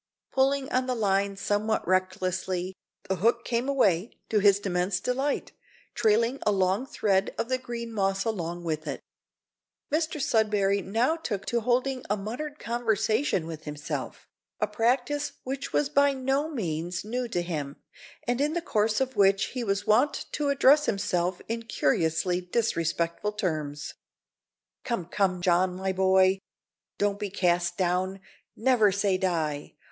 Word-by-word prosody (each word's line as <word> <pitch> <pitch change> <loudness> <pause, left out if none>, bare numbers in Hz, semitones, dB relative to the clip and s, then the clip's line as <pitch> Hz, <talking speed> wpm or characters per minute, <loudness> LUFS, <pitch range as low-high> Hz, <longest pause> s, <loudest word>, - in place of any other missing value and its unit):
Pulling 270 0 +2
on 255 0 +1
the 255 - 0
line 200 -2 +1
somewhat 210 +1 0
recklessly, 185 0 0 0.3
the 190 -1 0
hook 235 +5 +2
came 240 +3 -1
away, 205 -7 +2 0.2
to 215 - +3
his 200 -1 +5
immense 180 -1 0
delight, 265 +6 -1 0.4
trailing 230 +3 +2
a 210 - +2
long 195 +5 +1
thread 195 -5 0
of 230 - -2
the 255 0 +1
green 235 -2 -6
moss 195 -2 0
along 175 -6 -3
with 155 -1 -3
it. - - -3 0.9
Mr 315 0 0
Sudberry 210 -5 +2
now 230 - +1
took 225 - -4
to 235 - 0
holding 255 +2 0
a 210 - +1
muttered 250 +9 -5
conversation 230 - 0
with 160 -1 -8
himself 150 0 -5 0.3
a - - +2
practice 245 +7 0
which 270 +1 -4
was 295 - +2
by 285 -1 +3
no 270 +3 0
means 180 - -3
new 245 +3 -2
to 175 -6 -1
him, 150 -5 -4 0.5
and 245 +2 +1
in 300 +2 +1
the 345 - 0
course 215 -1 +1
of 260 -1 -1
which 195 -1 +3
he 250 -2 -2
was 200 -1 -1
wont 250 +7 +2
to 295 -1 -1
address 280 +2 +5
himself 180 -3 0
in 230 +1 -2
curiously 165 -2 +1
disrespectful 175 -1 -1
terms. 155 -7 -3 0.9
"Come, 235 -9 -2
come, 185 0 0
John, 180 +1 +3
my 190 +1 -2
boy, 190 0 +4 0.6
don't 205 0 0
be 205 -1 -3
cast 175 -2 +1
down! 185 +1 0 0.4
Never 225 -4 +4
say 200 -1 +1
die! 160 -6 -1
205 Hz, 150 wpm, -27 LUFS, 185-245 Hz, 0.9 s, his